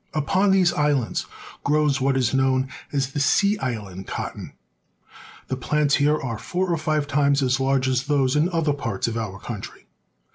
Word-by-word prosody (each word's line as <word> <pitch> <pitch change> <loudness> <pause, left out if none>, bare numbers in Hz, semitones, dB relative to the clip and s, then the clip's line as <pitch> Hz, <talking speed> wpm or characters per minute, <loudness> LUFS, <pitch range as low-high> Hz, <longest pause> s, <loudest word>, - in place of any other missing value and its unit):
Upon 185 +7 +2
these 190 -2 +4
islands 145 -5 0 0.4
grows 150 -2 +2
what 135 0 +2
is 125 -2 +1
known 130 0 +2 0.2
as 135 -2 -1
the 145 - -3
sea 200 +8 +3
island 105 -7 -5
cotton. - - -6 0.9
The 130 - -2
plants 145 +2 +1
here 150 +1 +2
are 115 -5 -4
four 175 +10 -1
or - - 0
five 155 -1 0
times 140 -1 +2
as 130 +1 +1
large 135 0 +1
as 130 +1 0
those 140 -2 +1
in 155 +4 +3
other 165 -4 +1
parts 115 -9 -3
of 115 - -3
our 110 -4 -4
country. - - -8
140 Hz, 175 wpm, -23 LUFS, 130-150 Hz, 0.9 s, these